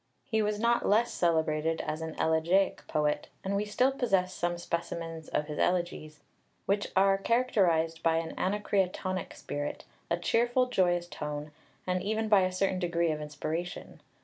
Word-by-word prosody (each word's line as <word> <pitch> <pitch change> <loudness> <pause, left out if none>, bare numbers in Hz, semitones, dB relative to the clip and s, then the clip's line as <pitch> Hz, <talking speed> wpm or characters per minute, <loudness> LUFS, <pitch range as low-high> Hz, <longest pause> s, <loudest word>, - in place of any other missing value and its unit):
He 220 -1 +1
was 210 0 0
not 235 +1 +2
less 225 +3 +3
celebrated 160 -1 +1
as 155 +1 -4
an 160 -1 -5
elegiac 170 +5 +2
poet, 150 -1 0 0.2
and 195 +1 -1
we 205 +1 0
still 250 +6 +2
possess 195 -9 +1
some 175 -1 -1
specimens 165 -2 -4
of 150 - -1
his 150 0 -6
elegies, 170 -4 -1 0.4
which 200 +1 +1
are 195 0 +4
characterised 185 -9 +2
by 165 -1 +3
an 165 0 -2
Anacreontic 185 -2 -1
spirit, 145 0 -5 0.2
a 170 - +1
cheerful, 240 +7 +2
joyous 175 -7 +1
tone, 150 -3 -5 0.3
and 180 0 0
even 220 +3 -1
by 205 -2 +6
a 185 0 +1
certain 185 0 0
degree 170 -2 +1
of 150 0 -3
inspiration. 160 +3 -5
180 Hz, 155 wpm, -30 LUFS, 160-200 Hz, 0.4 s, by